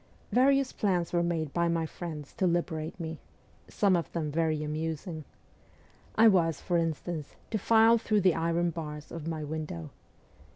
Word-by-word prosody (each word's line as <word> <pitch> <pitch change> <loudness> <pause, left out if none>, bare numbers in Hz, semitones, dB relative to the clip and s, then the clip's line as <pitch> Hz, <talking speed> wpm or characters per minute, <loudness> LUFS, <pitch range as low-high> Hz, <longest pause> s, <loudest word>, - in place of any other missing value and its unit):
Various 275 +1 +3
plans 180 -5 0
were 175 - +3
made 165 -4 -1
by 170 0 +2
my 165 -1 0
friends 155 -3 -7
to 190 -4 +2
liberate 170 -1 -1
me 160 -2 -5 0.5
some 200 -3 +2
of 170 - -2
them 155 -3 -2
very 155 -1 0
amusing. 155 +1 -4 0.9
I 225 +1 +7
was, 170 -6 +3
for 175 -2 0
instance, 165 -1 -3 0.2
to 215 - 0
file 225 +3 +5
through 215 -2 +1
the 185 -2 +4
iron 170 +1 +1
bars 150 -2 -7
of 165 -2 -6
my 160 -2 -3
window. 150 - -5
165 Hz, 160 wpm, -29 LUFS, 155-180 Hz, 0.9 s, I